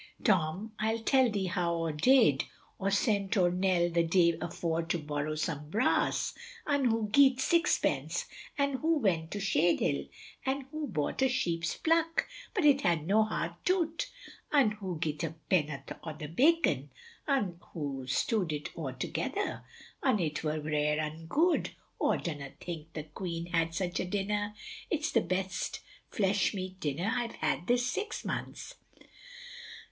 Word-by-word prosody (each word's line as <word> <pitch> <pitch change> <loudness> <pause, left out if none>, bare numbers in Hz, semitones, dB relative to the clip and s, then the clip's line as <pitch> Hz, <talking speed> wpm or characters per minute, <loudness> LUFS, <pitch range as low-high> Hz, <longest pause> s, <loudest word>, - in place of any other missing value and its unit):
Tom 190 +1 +1
I'll 220 +1 +1
tell 260 0 +4
thee 200 -3 -1
how 175 -2 0
aw 165 -1 -1
did, 150 - +4 0.3
aw 195 - +1
sent 200 0 +1
owr 175 -2 +4
Nell 180 -1 +2
th' 170 -1 +1
day 170 -1 +4
afore 165 -1 -1
to 165 +1 -1
borrow 150 0 -3
some 150 -1 -3
brass, 220 +9 +1 0.3
un 285 -3 +1
hoo 225 -2 +2
geet 265 0 +6
sixpence, 340 +5 +1 0.3
an' 280 -1 +1
hoo 320 +3 +2
went 170 - +1
to 205 - -4
Shade 175 -4 +2
Hill, - - 0 0.4
un 270 +1 0
hoo 310 -1 -3
bought 150 - -2
a 265 - +4
sheep's 170 -9 0
pluck, 330 0 +2 0.3
but 370 -7 +2
it 280 -2 +6
had 165 -3 +1
no 205 +5 +4
heart 170 -6 -2
toot, 340 -3 0 0.4
un 275 -8 +5
hoo 195 -5 -5
geet 155 0 -2
a 160 -1 -3 0.2
penoth 150 -6 0
o'th 155 0 -7
bacon, 330 - +3 0.4
un 205 - 0
hoo 140 -5 -4
stew'd 180 - +1
it 150 -1 -3
aw 155 -5 -3
together, 130 0 -3 0.4
un 260 -5 +3
it 155 -3 -1
wur 155 0 -1
rare 150 0 +1
un 155 +1 -4
good, 330 - +2 0.3
aw - - +3
dunna 145 -5 -4
think 165 -2 -7
th' 155 -1 -7
queen 170 -2 -4
had 165 0 +1
such 180 -1 -1
a - - 0
dinner, 205 +2 -1 0.3
it's 320 -1 0
the 230 - +4
best 185 +1 -2 0.3
flesh 200 0 +1
meat 185 0 -5
dinner 160 +8 -1
I've 240 -2 -2
had 155 +1 -1
this 245 0 +3
six 410 - -3
months. - - -4
185 Hz, 160 wpm, -31 LUFS, 160-245 Hz, 0.4 s, geet